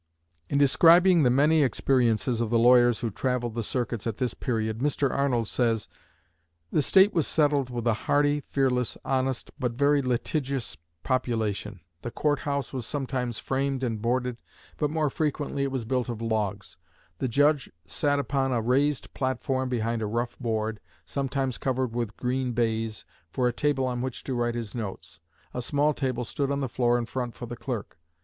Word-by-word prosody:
In 140 - +1
describing 170 +5 +6
the 130 - +4
many 150 +5 +4
experiences 120 -4 +2
of 115 - -1
the 120 - +3
lawyers 120 0 +5
who 115 - -1
travelled 125 +1 -1
the 115 - -2
circuits 120 -1 -2
at 110 -2 -3
this 125 -2 -1
period, 110 -3 -2
Mr. 140 0 +1
Arnold 125 -5 +1
says: 115 -3 0 0.8
"The 155 - +3
State 190 +7 +5
was 165 -4 +1
settled 145 -4 +2
with 120 -2 -4
a 115 - +3 0.2
hardy, 145 0 +3
fearless, 130 -4 0
honest, 130 -1 -1
but 125 -3 -1
very 140 +3 +3
litigious 130 +1 -2 0.3
population. 110 -6 -1 0.2
The - - -4
court 145 +3 0
house 140 -2 -3
was 125 -3 -4
sometimes 130 -5 -2
framed 135 0 -1
and 115 -4 -2
boarded, 125 +1 0 0.4
but 150 - 0
more 155 -2 0
frequently 145 -2 -2
it 140 0 0
was 130 -4 -3
built 125 +1 -1
of 115 -2 -4
logs. 105 -6 -2 0.4
The 130 - 0
judge 145 +2 +2
sat 145 -1 0
upon 135 -1 0
a 120 - +1
raised 135 +5 +1
platform 130 0 -1
behind 115 -2 -1
a 110 - -1
rough 120 +3 -2
board, 110 -2 -2 0.3
sometimes 135 - -2
covered 130 -2 -1
with 115 -3 -3
green 125 0 -1
baize, 115 -2 -1 0.2
for 125 +8 0
a 120 - 0
table 140 0 +1
on 125 -1 -2
which 130 -1 -4
to 135 - -3
write 120 -1 0
his 115 -4 -5
notes. 105 -10 -6 0.3
A 125 - -3
small 145 +4 +1
table 130 -3 -2
stood 140 +4 -2
on 140 0 -1
the 135 - -1
floor 120 0 +2
in 120 - -2
front 120 0 -4
for 120 - -7
the 120 - -6
clerk. 120 -7 -5
125 Hz, 180 wpm, -27 LUFS, 115-140 Hz, 0.8 s, describing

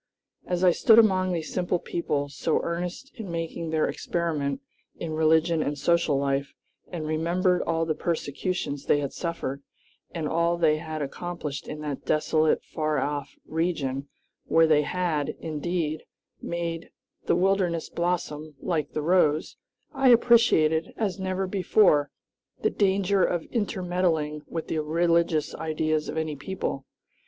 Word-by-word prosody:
As 180 0 -1
I 180 - +7
stood 220 +5 +5
among 190 -5 +4
these 165 -3 -3
simple 180 -1 0
people, 150 -5 -2
so 145 +3 0
earnest 175 - -4
in 210 -4 -6
making 165 0 -4
their 160 -1 +1
experiment 150 -5 -2 0.4
in 165 -2 -5
religion 160 +1 +3
and 145 0 -2
social 165 0 +2
life, 140 0 -1 0.3
and 165 -4 -5
remembered 175 +4 +1
all 165 0 0
the 160 - 0
persecutions 150 -2 -3
they 145 - +4
had 140 -1 -3
suffered 165 -5 -4 0.5
and 160 -3 -3
all 170 +2 +1
they 155 -2 +3
had 155 -2 -4
accomplished 150 -1 -5
in 150 - -6
that 145 -3 -4
desolate, 155 0 +2
far 155 -2 -2
off 145 +1 -2
region, 145 -5 -2 0.4
where 165 0 +5
they 155 -2 +4
had, 155 -2 -1
indeed, 160 0 -2 0.4
made 170 -1 -4 0.4
"the - - +4
wilderness 180 -2 +1
blossom 155 -3 -2
like 160 -2 -2
the 155 - -2
rose," 155 -3 +2 0.4
I 265 -1 +3
appreciated, 230 -10 +4
as 200 -4 -1
never 190 0 -1
before, 185 -5 +3 0.5
the - - +3
danger 195 -1 +2
of 175 -2 0
intermeddling 180 -8 -1
with 165 -1 -5
the 160 - -1
religious 165 0 +1
ideas 155 -1 -1
of - - -4
any 160 -1 -2
people. 140 -4 -4
165 Hz, 140 wpm, -26 LUFS, 150-180 Hz, 0.5 s, I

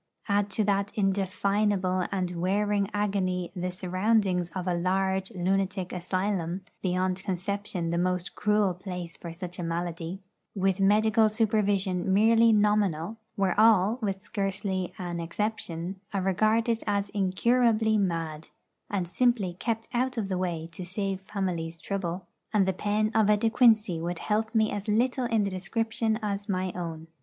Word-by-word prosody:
Add 205 0 +1
to 215 - +3
that 200 0 +1
indefinable 195 -1 +1
and 185 -2 -1
wearing 200 +2 +1
agony 190 -4 -1
the 180 0 -2
surroundings 185 0 +1
of 185 -2 -3
a 180 - +1
large 190 +2 0
lunatic 190 -1 -1
asylum 185 0 -1 0.2
beyond 185 0 0
conception 190 -2 -2
the 170 - 0
most 180 0 -1
cruel 210 -2 +2
place 180 -2 -6
for 170 - -8
such 175 +1 -7
a - - -2
malady 170 +1 -3 0.4
with 195 -1 +1
medical 215 +2 +4
supervision 200 -4 +1
merely 225 +3 +5
nominal, 210 -3 +2 0.2
where 195 -3 +1
all, 220 +1 +5
with 195 -2 -2
scarcely 195 -2 -2
an 175 -2 -4
exception, 180 0 -3 0.2
are 195 - +1
regarded 220 +4 +2
as 200 -1 0
incurably 220 +3 +2
mad, 165 -6 -1 0.4
and 190 -4 -1
simply 205 0 +1
kept 225 -1 -2
out 250 +1 0
of 205 -4 -2
the 185 - -1
way 170 -3 -2
to 175 +3 -7
save 195 +1 -3
families 180 -4 -3
trouble, 185 0 -4 0.3
and 205 -3 +3
the 190 - +2
pen 210 +3 0
of 215 -2 +3
a 210 - +5
De 225 +2 +1
Quincey 220 -8 +4
would 175 +1 -3
help 220 +4 -1
me 220 -1 +3
as 205 +1 -4
little 245 +4 +1
in 225 -3 +2
the 200 - -1
description 225 +3 -1
as 205 0 -3
my 185 -1 0
own. 165 -2 -5
195 Hz, 150 wpm, -28 LUFS, 180-210 Hz, 0.4 s, merely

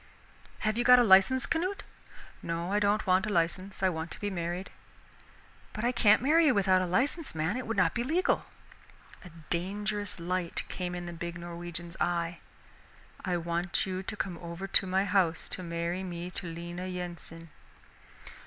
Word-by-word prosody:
"Have 215 +2 0
you - - +2
got 250 +1 +8
a 245 - +6
license, 200 +5 +6
Canute?" 365 +4 -1 0.6
"No, 170 +3 -3
I 205 - +3
don't 205 +1 +2
want 190 +2 +3
a - - -2
license. 185 +3 -1
I 190 - +5
want 160 -1 -4
to - - -7
be 205 -1 -2
married." 175 +1 -3 1.0
"But 215 - -3
I 245 - +3
can't 215 -2 +4
marry 320 +4 +5
you 265 - +4
without 190 -2 +4
a 185 - -1
license, 270 - 0
man, 160 +6 0
it 255 -2 -4
would 230 -1 -2
not 185 - +3
be 240 - -1
legal." 325 +8 +1 0.8
A 180 - -10 0.2
dangerous 205 +3 -2
light 175 0 -2
came 180 -1 -4
in 175 0 -5
the 175 - -6
big 170 0 -5
Norwegian's 170 0 -7
eye. 170 -1 0 0.8
"I 180 -2 0
want 170 +1 -1
you 185 -1 -3
to 200 +2 -6
come 180 -5 -3
over 170 +2 -6
to 195 0 +2
my 190 +2 +2
house 180 -4 +2
to - - -3
marry 170 +1 -2
me 175 -1 -5
to 180 - -4
Lena 175 +2 -6
Yensen." 170 -3 -7
185 Hz, 180 wpm, -30 LUFS, 170-205 Hz, 1.0 s, got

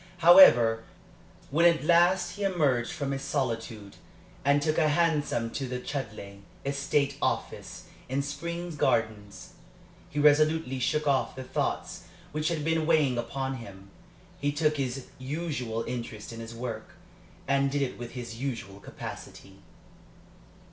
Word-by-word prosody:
However, 125 -11 +7 0.7
when 170 +4 +5
at 170 -3 +2
last 175 +3 +4
he 205 - -9
emerged 145 -11 +1
from 140 -4 -3
his 135 0 -3
solitude, 115 -7 -3 0.5
and 140 +1 +4
took 155 +2 0
a 155 - +4
hansom 145 -7 +1
to 135 - -3
the 125 0 -4
Chudleigh 110 -7 -6 0.3
estate 140 0 0
office - - -3 0.3
in 135 +2 0
Spring 170 +4 -5
Gardens, 110 -7 -1 0.6
he - - -9
resolutely 150 -2 +3
shook 150 +4 0
off 135 -2 +1
the 130 - -6
thoughts 125 - -3 0.3
which 155 +1 -1
had 155 -3 -1
been 160 -1 +1
weighing 145 -7 +3
upon 135 +3 -3
him. 100 -4 -12 0.5
He 145 0 0
took 150 +1 +1
his 130 -1 -3
usual 130 -5 -3
interest 115 -3 -6
in 115 - -8
his 115 0 -8
work, 115 -2 -6 0.5
and 140 0 +2
did 140 0 0
it 125 - -4
with 120 -1 -7
his 120 -2 -7
usual 115 -7 -4
capacity. 95 -1 -10
135 Hz, 140 wpm, -28 LUFS, 120-155 Hz, 0.7 s, However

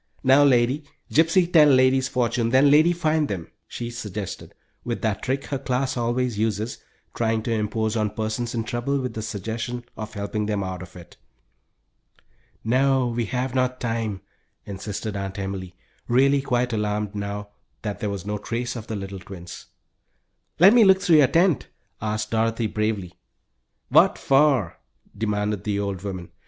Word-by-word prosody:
"No, 135 +2 +6
lady. 130 +2 +3 0.3
Gypsy 170 +3 +3
tell 155 -3 +8
lady's 130 -1 +4
fortune, 120 -2 0
then 135 +3 +5
lady 155 +4 +6
find 160 -3 +1
them," 90 -8 -5 0.2
she 120 0 -6
suggested, 105 -4 -6 0.3
with 120 -1 -4
that 110 -3 0
trick 135 +2 -2
her 140 - -3
class 130 0 -1
always 120 -1 -1
uses, 110 +1 -1 0.3
trying 110 -1 0
to 115 - -2
impose 110 0 -1
on 110 -2 +1
persons 110 +3 -3
in 115 - -1
trouble 120 +5 -2
with 125 -1 -3
the 110 - -4
suggestion 115 +3 -4
of 110 0 -7
helping 105 +1 -3
them 105 -2 -1
out 95 -1 -5
of 90 - -11
it. 85 -1 -13 1.5
"No, 130 +2 +2
we 120 0 -1
have 125 +2 -2
not 130 -1 0
time," 115 -5 -2 0.4
insisted 100 +1 -5
Aunt 100 0 -4
Emily; 95 -2 -5 0.3
really 135 +3 +4
quite 125 -2 0
alarmed 105 -1 -1
now 100 0 -5 0.3
that 105 -2 -4
there 105 - -2
was 100 -2 -5
no 105 0 -3
trace 120 +3 -3
of 115 -1 -7
the 110 - -4
little 95 -1 -6
twins. 90 -2 -10 0.9
"Let 190 +5 +8
me 240 -2 +7
look 190 -2 +6
through 165 -4 +4
your 145 -3 +6
tent?" 170 0 +2 0.3
asked 105 0 -2
Dorothy, 115 0 +1
bravely. 105 -4 -2 0.7
"What - - +5
for?" 135 - +2 0.4
demanded 105 -2 -1
the 105 -1 -1
old 100 -2 -3
woman. 95 -3 -6
115 Hz, 160 wpm, -24 LUFS, 105-130 Hz, 1.5 s, tell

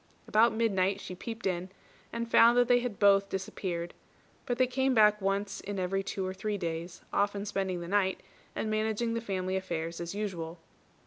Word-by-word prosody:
About 225 +2 +5
midnight 200 -4 +1
she 185 - -7
peeped 225 +5 -7
in, 185 -1 -1 0.4
and 235 0 -3
found 235 +1 +6
that 245 -1 +5
they 245 0 +5
had 240 -5 -4
both 200 -1 +5
disappeared; 180 -2 -4 0.5
but 245 - 0
they 255 - +4
came 265 +1 +1
back 210 -1 +5
once 195 0 -1
in 205 0 -5
every 190 +1 0
two 195 0 -3
or 185 - -3
three 205 +2 -3
days, 170 0 -4
often 200 0 +1
spending 190 -3 -2
the 170 - -6
night, 190 0 +1 0.4
and 215 - -2
managing 220 +2 0
the 230 - -1
family 190 -3 -2
affairs 170 -3 -3
as 170 +3 -5
usual. 175 -5 -4
200 Hz, 185 wpm, -30 LUFS, 185-220 Hz, 0.5 s, found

